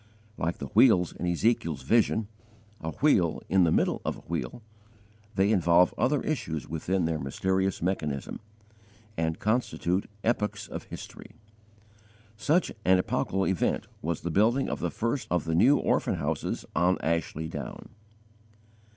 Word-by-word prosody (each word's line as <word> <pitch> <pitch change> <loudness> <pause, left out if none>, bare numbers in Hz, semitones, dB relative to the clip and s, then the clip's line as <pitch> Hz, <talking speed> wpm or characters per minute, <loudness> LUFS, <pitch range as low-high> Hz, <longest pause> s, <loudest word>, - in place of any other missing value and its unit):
Like 85 +2 -2
the - - -5
wheels 90 -1 +5
in 90 - -4
Ezekiel's 85 -3 0
vision 110 -1 +2 0.5
a 80 - -4
wheel 90 - +2
in 95 -2 +4
the 80 - +2
middle - - +1
of - - -2
a - - -13
wheel, 65 - -5 0.7
they 100 +2 +3
involve 90 -3 +4
other 145 +1 +1
issues 80 - -3
within 90 +3 -1
their 80 -1 -1
mysterious 95 +7 -1
mechanism, 75 -7 -2 0.8
and 80 -2 -1
constitute 105 -5 0
epochs 110 -2 -1
of - - -7
history. - - -10 1.0
Such 155 +10 +1
an 95 0 +5
epochal 95 +1 0
event 95 -4 0 0.2
was 85 +1 -2
the 85 - -3
building 115 - +2
of - - -3
the - - -1
first 115 +4 -2
of 90 -3 0
the 80 - -1
New 125 - +5
Orphan - - +1
Houses - - -3
on 90 +3 +3
Ashley 80 -1 -1
Down. - - -7
90 Hz, 140 wpm, -28 LUFS, 80-110 Hz, 1.0 s, wheels